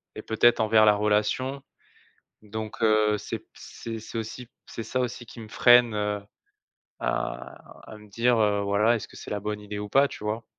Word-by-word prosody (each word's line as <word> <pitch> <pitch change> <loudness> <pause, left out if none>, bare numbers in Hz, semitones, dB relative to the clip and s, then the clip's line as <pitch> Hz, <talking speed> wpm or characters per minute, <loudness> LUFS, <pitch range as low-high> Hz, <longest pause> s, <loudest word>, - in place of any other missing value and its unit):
et 110 - -6
peut-être 115 +2 +3
envers 110 0 +4
la 105 - +6
relation, 105 +6 0 0.8
donc 110 +1 -7
heu, 110 -1 +3
c'est - - -5
p - - -29
c'est 115 -1 -8
c'est 115 +1 -8
aussi 115 +2 -6 0.2
c'est 115 - -7
ça 130 - -3
aussi 125 -1 -3
qui 115 - -12
me 110 - -9
freine, 120 0 +5
heu, 105 -1 -2 0.8
à 65 0 -3 0.4
à 110 - -9
me 105 0 -16
dire 115 +4 +2
heu, 105 -1 +2
voilà: 100 +4 +2
«Est-ce 110 - -5
que - - -17
c'est - - -9
la 105 - -2
bonne 105 +1 -3
idée 105 0 -7
ou 105 0 -6
pas?», 135 +5 +4
tu - - -10
vois? 110 +2 -3
110 Hz, 200 wpm, -26 LUFS, 105-115 Hz, 0.8 s, la